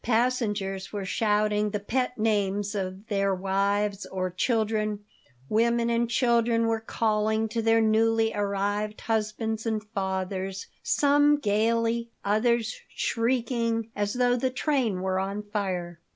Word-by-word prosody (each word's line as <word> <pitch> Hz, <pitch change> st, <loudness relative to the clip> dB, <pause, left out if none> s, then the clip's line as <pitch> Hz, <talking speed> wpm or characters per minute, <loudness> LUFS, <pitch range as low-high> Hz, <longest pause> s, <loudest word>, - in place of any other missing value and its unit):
Passengers 220 Hz, -5 st, 0 dB
were 205 Hz, -2 st, -4 dB
shouting 210 Hz, +1 st, +1 dB
the 210 Hz, 0 st, -2 dB
pet 250 Hz, +4 st, -1 dB
names 205 Hz, -2 st, 0 dB
of 190 Hz, 0 st, -4 dB
their 195 Hz, -3 st, +1 dB
wives 200 Hz, +2 st, 0 dB
or 185 Hz, -1 st, -3 dB
children; 215 Hz, 0 st, 0 dB, 0.4 s
women 235 Hz, +3 st, +2 dB
and 235 Hz, 0 st, +1 dB
children 235 Hz, -1 st, +2 dB
were 225 Hz, 0 st, +1 dB
calling 220 Hz, 0 st, 0 dB
to 230 Hz, +2 st, -1 dB
their 225 Hz, 0 st, +4 dB
newly 225 Hz, 0 st, +3 dB
arrived 205 Hz, +1 st, -1 dB
husbands 220 Hz, 0 st, -1 dB
and 220 Hz, -1 st, -1 dB
fathers, 190 Hz, 0 st, -3 dB, 0.2 s
some 290 Hz, +1 st, +4 dB
gaily, 230 Hz, 0 st, +1 dB, 0.2 s
others 220 Hz, +2 st, +1 dB
shrieking, 230 Hz, -1 st, -1 dB
as 205 Hz, +1 st, -1 dB
though 245 Hz, 0 st, +3 dB
the 255 Hz, +1 st, 0 dB
train 255 Hz, -8 st, 0 dB
were 190 Hz, 0 st, 0 dB
on 200 Hz, +2 st, -3 dB
fire. 185 Hz, -5 st, -3 dB
215 Hz, 125 wpm, -27 LUFS, 200-230 Hz, 0.4 s, their